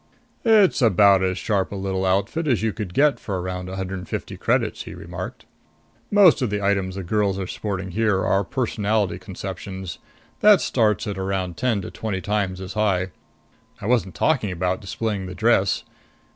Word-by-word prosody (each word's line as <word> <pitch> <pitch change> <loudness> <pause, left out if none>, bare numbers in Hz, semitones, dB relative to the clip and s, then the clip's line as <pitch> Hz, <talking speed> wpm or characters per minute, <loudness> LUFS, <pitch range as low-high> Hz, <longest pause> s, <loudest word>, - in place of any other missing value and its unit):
"It's 215 - +5
about 100 -3 +5
as 95 0 0
sharp 100 -1 0
a - - -4
little 95 -1 -1
outfit 100 - 0
as 120 -6 +1
you 110 -2 0
could 100 -6 -6
get 145 0 +4
for 95 -3 -3
around 90 0 -4
a 95 - -5
hundred 95 0 -4
and 90 - -10
fifty - - -4
credits," - - 0
he - - -8
remarked. - - -7 0.6
"Most 200 -7 +6
of 125 - +1
the 105 0 -1
items 100 -2 0
the 95 - -4
girls 100 +1 0
are 95 - -3
sporting 95 -1 -4
here 105 -1 +1
are 100 +1 +2
personality 105 -4 -1
conceptions. 95 0 -7 0.4
That 210 -2 +7
starts 110 -5 +1
at 100 -3 -4
around 95 -2 -2
ten 115 -6 0
to - - -7
twenty 105 -4 -3
times 95 -1 -1
as 95 0 -6
high. 95 -4 +1 0.7
I - - -8
wasn't 110 -5 +1
talking 135 -10 +1
about 90 +1 -1
displaying 100 -1 -3
the 90 - -7
dress. 110 -3 +2
100 Hz, 180 wpm, -23 LUFS, 95-110 Hz, 0.7 s, That